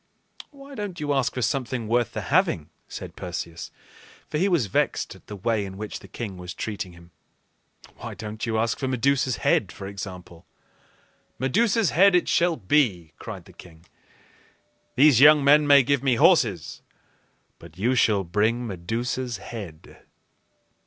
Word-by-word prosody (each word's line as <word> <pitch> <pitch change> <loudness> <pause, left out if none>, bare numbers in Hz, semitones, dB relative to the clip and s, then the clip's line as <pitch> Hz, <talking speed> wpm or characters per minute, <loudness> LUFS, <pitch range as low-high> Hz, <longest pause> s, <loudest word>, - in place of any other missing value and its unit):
"Why 280 -1 -14
don't 205 -7 -6
you 145 -1 -1
ask 135 -2 0
for 125 - -2
something 120 -1 -2
worth 120 0 0
the - - -3
having?" 75 - +1 0.2
said - - -8
Perseus; 85 -2 -6 0.6
for 150 - -1
he 195 +3 +2
was 170 - +2
vexed 95 - -1
at - - -19
the 105 - -7
way 110 +1 -1
in 95 -1 -8
which 105 +1 -6
the - - -14
king 105 -6 -7
was 90 0 -8
treating 100 -4 -5
him. 85 0 -17 0.9
"Why - - -8
don't 110 0 -7
you 115 -2 -1
ask 115 +1 0
for 135 - -2
Medusa's 130 0 +1
head, 100 - +2
for 100 - -9
example?" 95 -4 -9 0.9
"Medusa's 205 - +1
head 195 +3 +5
it 180 - +2
shall 170 0 +2
be!" 95 - +1
cried - - -8
the - - -16
king. 85 -1 -16 1.1
"These 135 -1 +5
young 150 0 +8
men 145 +1 +5
may 140 -1 +7
give 140 +1 +1
me 135 -3 +2
horses, 115 - +2 0.8
but 85 0 -15
you 115 +7 +1
shall 105 -5 +2
bring 110 +7 0
Medusa's 115 +5 -3
head." 95 -7 -10
115 Hz, 160 wpm, -24 LUFS, 95-140 Hz, 1.1 s, young